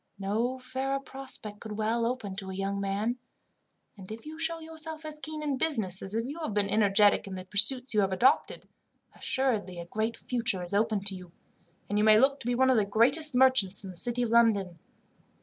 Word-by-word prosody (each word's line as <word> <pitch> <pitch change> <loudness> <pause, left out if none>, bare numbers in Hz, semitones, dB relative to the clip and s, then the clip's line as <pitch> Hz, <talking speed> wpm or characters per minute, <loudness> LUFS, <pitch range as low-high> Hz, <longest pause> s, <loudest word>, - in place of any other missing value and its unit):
"No 220 +6 -2
fairer 265 +2 -3
prospect 265 -6 -7
could 220 -2 -8
well 225 +2 0
open 225 -6 -4
to 195 -1 -5
a 190 - -6
young 195 +1 -3
man, 205 +5 -2 0.8
and 195 -1 -12
if 225 +4 -9
you 315 +1 -9
show 330 0 -1
yourself 320 0 -5
as 305 -1 -7
keen 310 0 -6
in 280 -3 -2
business, 215 - +1
as 195 +2 -5
you 290 +6 -7
have 305 -11 -4
been 205 -1 +1
energetic 205 -1 +3
in 190 - -6
the 185 0 -8
pursuits 240 +7 +3
you 210 - +3
have 195 -1 0
adopted, 245 +9 +1 0.5
assuredly 220 -9 -2
a 170 - -7
great 220 +5 -3
future 230 -7 -1
is 175 - -4
open 215 0 +1
to 195 0 -1
you, 180 -2 -11 0.6
and 205 +1 -1
you - - +2
may 215 0 +6
look 275 +3 +2
to - - -7
be 245 - +1
one 260 +1 +3
of 255 - +3
the 210 - +2
greatest 260 +8 +3
merchants 250 -7 +4
in 190 - -7
the - - -14
city 245 +6 -1
of 230 - -2
London. 205 -7 +2
225 Hz, 210 wpm, -28 LUFS, 200-265 Hz, 0.8 s, may